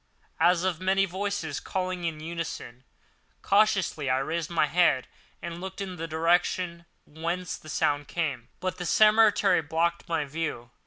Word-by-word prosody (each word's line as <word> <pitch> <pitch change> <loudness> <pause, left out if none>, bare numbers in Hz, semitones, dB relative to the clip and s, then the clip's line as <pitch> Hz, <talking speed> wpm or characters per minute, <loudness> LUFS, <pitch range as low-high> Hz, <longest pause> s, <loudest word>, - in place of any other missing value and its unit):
as 175 +1 +4
of 185 -2 -1
many 190 +1 +3
voices 190 -5 -3
calling 185 -2 -3
in 160 -2 -3
unison. 160 -6 -6 0.6
Cautiously 195 -8 +2
I 130 - +3
raised 160 +4 -2
my 170 -3 +2
head 155 -3 +3 0.4
and 170 0 -6
looked 190 0 -7
in 190 -2 -5
the 165 +1 -4
direction 170 +1 +1 0.2
whence 170 +4 -3
the 155 - -12
sound 145 -1 0
came; 140 -9 -2
but 185 -1 -3
the 175 - -3
cemetery 210 -4 +5
blocked 165 +3 -1
my 165 -3 0
view. 140 -5 -4
170 Hz, 150 wpm, -27 LUFS, 155-185 Hz, 0.6 s, cemetery